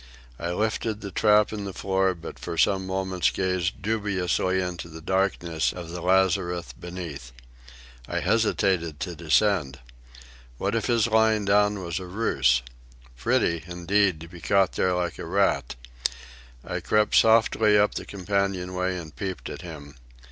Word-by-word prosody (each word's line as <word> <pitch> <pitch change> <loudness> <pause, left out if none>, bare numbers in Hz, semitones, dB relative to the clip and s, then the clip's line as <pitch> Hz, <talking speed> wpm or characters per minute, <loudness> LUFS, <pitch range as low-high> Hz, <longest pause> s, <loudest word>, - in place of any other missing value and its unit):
I 85 - -3
lifted 110 +3 -1
the 100 - -6
trap 105 +2 +4
in 105 -1 -4
the 95 -2 -6
floor, 95 -1 +1
but 85 - -9
for 85 - -5
some 95 +2 +2
moments 95 -1 0
gazed 95 +1 -1
dubiously 95 -3 0
into 90 -2 -4
the 80 0 -9
darkness 85 -2 0
of 85 -2 -8
the 90 0 -6
lazarette 90 -1 +1
beneath. 85 -8 -7 0.8
I - - -2
hesitated 95 -8 +1
to 90 - -3
descend. 80 -2 +1 0.8
What 100 - -1
if 115 - 0
his 115 -3 +3
lying 110 -2 +3
down 105 +1 +3
were 85 -2 -6
a 95 - -7
ruse? 90 - +1 0.5
Pretty, 80 +6 +1
indeed, 90 0 +1
to 85 - -8
be 90 0 -12
caught 100 -2 +3
there 90 - +1
like 90 -1 -2
a - - -5
rat. 95 -4 +1 0.9
I - - -3
crept 105 -1 +1
softly 110 -1 +5
up 105 0 +3
the - - -4
companion 100 -1 -2
way 90 0 -1
and 80 -4 -9
peeped 95 -2 -5
at - - -7
him. 75 -5 -9
95 Hz, 155 wpm, -25 LUFS, 85-100 Hz, 0.9 s, softly